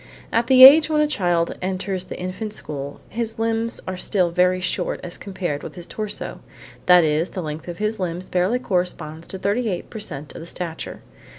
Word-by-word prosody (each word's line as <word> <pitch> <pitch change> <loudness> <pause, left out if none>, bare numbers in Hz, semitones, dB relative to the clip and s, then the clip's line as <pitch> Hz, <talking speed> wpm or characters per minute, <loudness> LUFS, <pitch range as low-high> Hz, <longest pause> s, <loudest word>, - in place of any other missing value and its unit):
At 230 +1 +2
the 260 -1 +8
age 300 +3 +9
when 305 -1 +2
a - - +4
child 175 - 0
enters 185 0 -2
the - - -8
infant 185 +4 -4
school 140 -6 -6
his 225 -1 -4
limbs 225 +1 0
are 185 0 -3
still 180 -2 +1
very 180 +1 +3
short 180 - -1
as 175 -1 -4
compared 180 -7 -4
with - - -8
his 175 -2 -8
torso; 215 +2 -5 0.5
that 180 -1 +8
is, 155 +3 +1
the 185 - -5
length 155 +2 -6
of 175 -1 -6
his 215 +1 -2
limbs 180 0 -3
barely 185 +7 +1
corresponds 175 -7 -3
to 190 - -6
38 200 0 -1
per 220 - -6
cent 150 -7 -7
of - - -8
the 165 - -9
stature. 170 -2 -6
185 Hz, 195 wpm, -22 LUFS, 170-215 Hz, 0.5 s, age